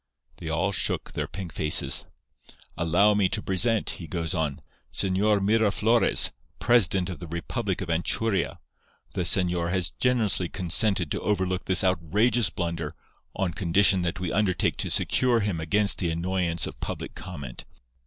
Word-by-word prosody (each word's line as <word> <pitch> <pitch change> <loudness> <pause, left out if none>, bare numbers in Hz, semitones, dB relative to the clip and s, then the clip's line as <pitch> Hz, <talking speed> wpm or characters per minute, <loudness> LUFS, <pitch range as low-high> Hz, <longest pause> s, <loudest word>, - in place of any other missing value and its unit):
"They 80 - -7
all 85 +5 0
shook - - -1
their - - -3
pink 95 -3 -7
faces. 75 0 +1 0.7
"'Allow 90 +5 +3
me 100 -2 +2
to 105 - -1
present,' 105 +3 +1
he 85 - -7
goes 85 0 -3
on, 75 -5 -2 0.3
Señor 100 +2 +1
Miraflores, 110 +2 +3 0.3
president 95 -6 +3
of 90 - -8
the 85 - -8
republic 85 +1 -3
of - - -5
Anchuria. 95 +4 0 0.6
The - - -2
señor 90 -1 +1
has 90 -1 0
generously 110 -8 0
consented 90 -1 +2
to - - -2
overlook 95 -3 -1
this 95 0 +3
outrageous 95 +5 +2
blunder, 85 -2 -4 0.4
on 90 -3 -1
condition 95 +3 +2
that 85 -1 -3
we 90 -1 -3
undertake 95 -5 0
to - - -1
secure 125 -3 +2
him 100 -5 -2
against 100 +5 +2
the 85 - 0
annoyance 85 0 -1
of - - -8
public - - -5
comment. 70 -10 -8
90 Hz, 150 wpm, -26 LUFS, 85-105 Hz, 0.7 s, Allow